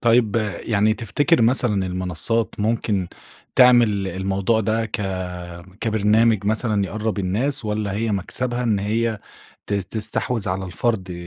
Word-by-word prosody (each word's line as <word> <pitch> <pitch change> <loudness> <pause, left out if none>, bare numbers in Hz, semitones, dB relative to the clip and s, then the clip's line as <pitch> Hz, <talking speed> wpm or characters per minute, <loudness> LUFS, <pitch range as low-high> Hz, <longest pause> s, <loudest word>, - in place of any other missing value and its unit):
طيب 115 -2 +3 0.3
يعني 110 0 +2
تفتكر 120 - +1
مثلًا 115 -5 +2
المنصات 90 +5 -1
ممكن 105 -4 0 0.5
تعمل 120 -6 +5
الموضوع 95 +4 0
ده 110 +1 0
ك 105 - -4 0.8
كبرنامج 110 -1 +2
مثلًا 110 -1 +1
يقرّب 105 +2 -3
الناس، 115 +9 -1
والّا 105 -2 -2
هي 110 +1 -1
مكسبها 120 +5 -2
إن 110 -4 +1
هي 110 +2 -1 0.5
ت - - -5
تستحوذ 110 +2 -1
على 95 +1 -2
الفرد 95 0 -2
110 Hz, 125 wpm, -22 LUFS, 100-115 Hz, 0.8 s, تعمل